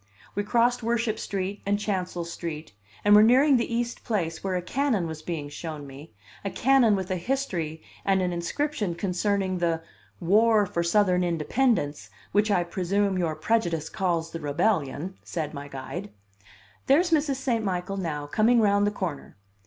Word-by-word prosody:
We 205 - -1
crossed 240 +3 +2
Worship 230 -1 0
Street 195 0 -3
and 200 +1 +1
Chancel 185 -4 -2
Street, 165 - -6 0.3
and 205 - +6
were 210 - +9
nearing 260 +5 +6
the 235 - -2
East 235 +1 -2
Place 165 -7 -2
where 190 -1 -1
a 180 - 0
cannon 250 -4 0
was 160 -1 -6
being 155 -3 -4
shown 150 0 -7
me, 140 +3 -11 0.3
a 200 - -2
cannon 245 0 +4
with 190 -1 -3
a 185 - 0
history 175 - -2 0.2
and 195 -1 +2
an 180 -1 0
inscription 205 - -2
concerning 190 +1 0
the 165 -1 0 0.4
"war 210 +4 +4
for 170 -2 -2
Southern 180 +1 +3
independence, 170 - 0 0.2
which 205 +1 +2
I 180 -4 +3
presume 190 +2 0
your 165 -3 0
prejudice 170 -9 0
calls 170 -3 -1
the 165 - -5
Rebellion," 160 +1 -1
said 155 -3 -4
my 140 -1 -7
guide. 135 -6 -6 0.8
"There's 330 +6 +4
Mrs. 295 -3 +2
St. 250 -4 -1
Michael 190 0 -2
now, 155 -6 -3
coming 225 +10 +3
round 205 -1 +3
the - - +1
corner. 175 - -5
190 Hz, 165 wpm, -26 LUFS, 165-220 Hz, 0.8 s, were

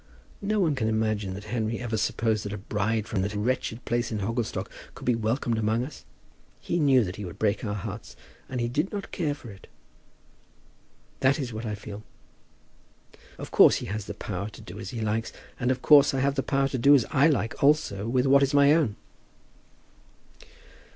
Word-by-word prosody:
No 210 +1 0
one 165 -6 +2
can 120 -5 -1
imagine 110 -3 -1
that 100 - -8
Henry 115 -1 -1
ever 120 -2 -3
supposed 110 0 0
that 100 - -5
a - - -4
bride 105 +2 -1
from 105 -5 -1
that 105 +2 -2
wretched 120 +2 -2
place 120 +1 -1
at 105 -2 -2
Hogglestock 115 +3 -2 0.3
could - - -10
be 125 - +3
welcomed 115 +1 -1
among 110 +2 +1
us. 150 - -11 0.5
He 175 - -2
knew 135 -5 +5
that 90 -2 -5
he 105 - -6
would 90 -3 -8
break 105 +1 0
our 105 -2 -2
hearts, 105 +1 -7 0.3
and 130 - -3
he 120 - 0
did 150 +10 -1
not 200 -1 -5
care 150 -5 -1
for 120 -6 -11
it. 95 - -15 1.5
That 130 +1 +3
is 130 -6 -4
what 110 +1 -5
I 105 - -2
feel. 105 0 -9 1.4
Of - - -8
course - - +7
he - - -4
has 105 -1 -4
the 105 - -7
power 100 0 -4
to - - -13
do 90 +4 -10
as 110 - -6
he 120 -3 -5
likes; 110 +1 -1 0.3
and 125 - 0
of 130 0 -1
course 145 -2 +6
I - - 0
have 140 +1 +2
the 135 - 0
power 135 0 +1
to 130 - -3
do 140 +4 +7
as 130 - +3
I 145 +1 +5
like 135 -7 -1
also 140 -9 +2
with 125 +2 +1
what 140 +1 +5
is 140 +1 +2
my 140 +1 +6
own." 145 -11 +1
115 Hz, 205 wpm, -26 LUFS, 105-135 Hz, 1.5 s, course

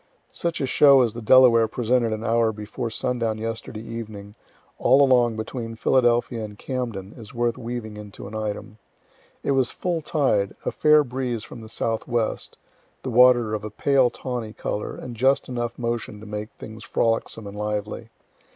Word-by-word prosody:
Such 170 -1 -2
a - - +1
show 140 0 +6
as 115 -4 +1
the 120 - -7
Delaware 115 -1 +6
presented 120 +1 +1
an 110 0 -3
hour 115 0 +2
before 110 +3 -5
sundown 115 -1 -1
yesterday 110 0 -5
evening, 110 -3 -7 0.5
all 135 +3 +5
along 125 -4 +4
between 115 +1 -5
Philadelphia 120 -1 +2
and 105 -1 -8
Camden, 115 -7 -4
is 115 -2 -12
worth 120 0 +1
weaving 115 -3 -6
into 105 -1 -9
an 105 - -10
item. 110 0 -5 0.6
It - - 0
was 135 -2 +2
full 175 -3 -2
tide, 130 - +1
a - - 0
fair 150 0 +5
breeze 125 -3 -3
from 115 - -10
the 110 - -11
southwest, 115 0 -2 0.5
the 130 - -3
water 120 -2 +5
of 105 -1 -3
a 110 - -4
pale 130 +3 +3
tawny 120 -3 -5
color, 105 - -4
and 120 -2 -8
just 130 +4 +2
enough 120 -2 -3
motion 115 -3 -3
to 110 - -11
make 105 0 -5
things 110 0 -10
frolicsome 115 -1 -1
and 100 0 -8
lively. 105 +1 -4
115 Hz, 170 wpm, -24 LUFS, 110-125 Hz, 0.6 s, show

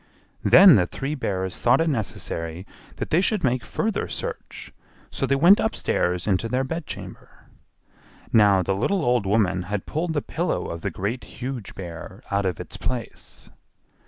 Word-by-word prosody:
Then 190 - +8
the 90 -2 +2
three 135 - -4
bears 95 -9 -3
thought 120 +2 +4
it 165 - +2
necessary 90 - -3 0.3
that - - -5
they 165 - +4
should 205 0 0
make 125 -2 +1
further 220 -2 -2
search; - - -6 0.4
so - - -2
they 140 - +2
went 175 +9 +6
upstairs 90 - 0
into 105 +3 0
their 130 +3 0
bedchamber. 160 +3 -7 1.0
Now 100 -4 +5
the 95 - 0
little 160 - 0
old 120 -5 +2
woman 95 -3 +2
had 105 -2 -3
pulled 160 +2 -2
the 145 - -1
pillow 175 +3 -2
of 85 0 -6
the - - -2
Great, 110 +7 -4
Huge 125 -4 -7
Bear 85 -3 -9
out 100 -1 +1
of 90 -4 -3
its - - -7
place. 125 -3 -6
120 Hz, 160 wpm, -24 LUFS, 95-150 Hz, 1.0 s, Then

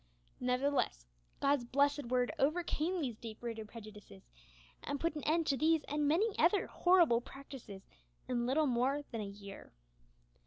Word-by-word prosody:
Nevertheless, 250 - 0 0.3
God's 280 -2 +2
blessed 285 +3 +1
Word 245 0 +1
overcame 335 +3 0
these 245 -7 -3
deep 220 -2 -7
rooted 225 -2 -5
prejudices, 210 - -12 0.6
and 285 0 -3
put 335 +1 0
an 300 - -4
end 325 +2 +2
to 275 -3 +1
these 315 +2 +3
and 295 0 -1
many 395 +8 +2
other 355 +6 +4
horrible 345 -10 +4
practices 255 -7 -10 0.4
in 240 -1 0
little 300 +4 +3
more 265 +3 +1
than 230 -3 -3
a - - -3
year. 200 0 -10
270 Hz, 150 wpm, -34 LUFS, 235-300 Hz, 0.6 s, other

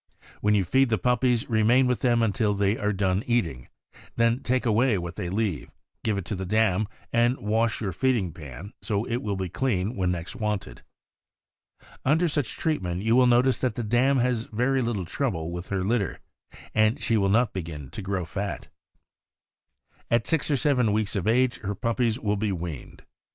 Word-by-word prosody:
When 105 0 +2
you 100 -3 +2
feed 130 +8 +3
the 110 - +2
puppies, 125 -1 +1
remain 115 +3 +4
with 125 -1 +1
them 120 -2 +2
until 105 -1 +1
they 100 +1 +2
are 105 -2 -1
done 95 0 0
eating; 85 - 0 0.5
then 115 +1 +2
take 130 +1 0
away 115 0 +3
what 85 -1 -5
they 85 - -4
leave, 100 -5 -2 0.3
give 110 -3 0
it 95 - -4
to 105 - -3
the 95 - -4
dam, 105 0 +1 0.3
and 120 +2 +3
wash 110 +2 0
your 100 -4 -1
feeding 105 - 0
pan, 75 - -10
so 105 +1 -1
it 120 -1 -1
will 105 -2 -2
be 95 -1 -3
clean 105 0 -1
when 95 -2 0
next 90 +4 -4
wanted. 105 - -3 1.2
Under 160 +6 +3
such 145 -6 -2
treatment 95 - -1
you 115 +1 +3
will 125 0 +5
notice 125 +2 +3
that 125 -4 -1
the 120 - -3
dam 125 +5 +2
has 125 -2 +1
very 125 +4 0
little 115 -6 -2
trouble 85 - -2
with 85 +1 -6
her 95 -2 -1
litter, 100 -2 -1 0.5
and 110 +5 +3
she 115 - +1
will 100 -2 +2
not 115 +2 +2
begin 80 -7 -6
to - - -6
grow 95 -2 -2
fat. 100 +4 -5 1.4
At 115 -1 +2
six 160 -2 +2
or 145 - +2
seven 125 -5 +2
weeks 110 0 0
of 100 0 -1
age 125 +2 +2
her 100 0 -4
puppies 115 +1 0
will 105 -3 0
be 105 0 -1
weaned. 85 -6 -6
110 Hz, 190 wpm, -26 LUFS, 95-120 Hz, 1.4 s, will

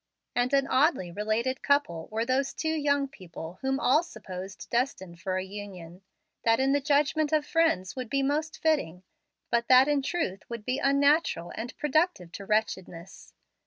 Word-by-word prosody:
And 245 +1 +1
an 275 -1 +3
oddly 260 - +2
related 220 +7 -1
couple 280 - +1
were 225 +1 -1
those 260 +2 0
two 315 0 -1
young 285 -2 +1
people 175 -7 -10
whom 270 0 0
all 295 +2 +4
supposed 190 - -9
destined 190 -9 -2
for 185 -1 -1
a 185 - -2
union, 190 -3 -9 0.4
that 225 +1 +3
in 265 +1 +2
the 285 0 +2
judgment 295 +1 +2
of 305 -1 +2
friends 320 - +1
would 255 -3 -5
be 275 +2 +1
most 305 +3 -1
fitting, 190 - +1 0.5
but 235 0 +1
that 255 +1 +7
in 290 -1 +2
truth 270 - -2
would 230 -3 -6
be 255 +1 -1
unnatural 280 - +2
and 235 +2 -6
productive 300 - 0
of 195 - -10
wretchedness. 190 -5 -3
255 Hz, 165 wpm, -28 LUFS, 190-285 Hz, 0.5 s, that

